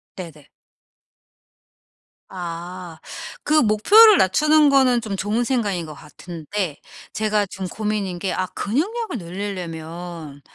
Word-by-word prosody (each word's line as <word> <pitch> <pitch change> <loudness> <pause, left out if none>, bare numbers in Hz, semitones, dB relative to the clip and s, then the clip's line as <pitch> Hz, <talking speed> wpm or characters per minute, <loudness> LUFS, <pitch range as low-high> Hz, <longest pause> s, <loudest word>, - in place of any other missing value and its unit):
네네. 160 -6 -10 1.8
아. 175 -1 -7 0.4
그 300 - -1
목표를 400 - +7
낮추는 300 +9 +4
거는 260 -3 +4
좀 215 -3 -4
좋은 210 +5 -1
생각인 205 -9 -1
거 155 - -9
같은데 165 +3 -6 0.4
제가 215 -1 +1
좀 190 0 -6
고민인 205 -3 -3
게 195 - -3
아 185 - -1
근육량을 365 - -2
늘릴려면 170 -4 -7
195 Hz, 215 characters per minute, -22 LUFS, 170-230 Hz, 1.8 s, 목표를